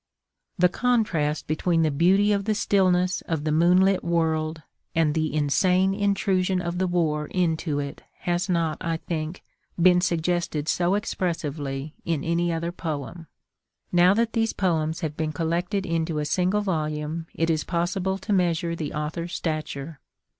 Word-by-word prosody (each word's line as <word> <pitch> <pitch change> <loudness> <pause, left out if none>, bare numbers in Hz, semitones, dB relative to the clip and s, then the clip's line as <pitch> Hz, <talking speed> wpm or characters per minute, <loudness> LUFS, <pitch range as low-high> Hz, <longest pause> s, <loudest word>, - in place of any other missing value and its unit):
The 180 - +5
contrast 185 -9 0
between 165 +2 +1
the 155 - +2
beauty 190 +8 +3
of 200 -1 0
the 215 0 +1
stillness 185 -3 +2
of 160 -3 -1
the 155 - 0
moonlit 180 +4 +4
world 160 -2 0 0.3
and 160 -2 +3
the 155 0 0
insane 180 +6 +2
intrusion 195 -2 +1
of 175 0 -3
the 185 - +1
war 155 -4 0
into 160 -4 0
it 140 -1 -4 0.2
has 175 0 -1
not, 165 -3 0
I 165 -2 -1
think, 160 0 -5 0.4
been 180 0 +5
suggested 170 -3 -1
so 175 +3 +2
expressively 155 -8 -3
in 165 -4 -1
any 170 +1 +1
other 170 +1 -2
poem. 160 -1 -5 0.6
Now 180 +2 +5
that 230 0 +1
these 225 -1 +1
poems 165 -3 0
have 155 -3 -3
been 155 -1 -2
collected 175 +5 -1
into 165 -1 -1
a 150 - -1
single 185 +6 +1
volume 155 -3 -2
it 165 0 +1
is 155 -2 0
possible 185 +2 -1
to 205 +1 -3
measure 170 -2 +1
the 155 -3 -4
author's 160 +3 -3
stature. 155 -2 -4
170 Hz, 155 wpm, -25 LUFS, 155-185 Hz, 0.6 s, The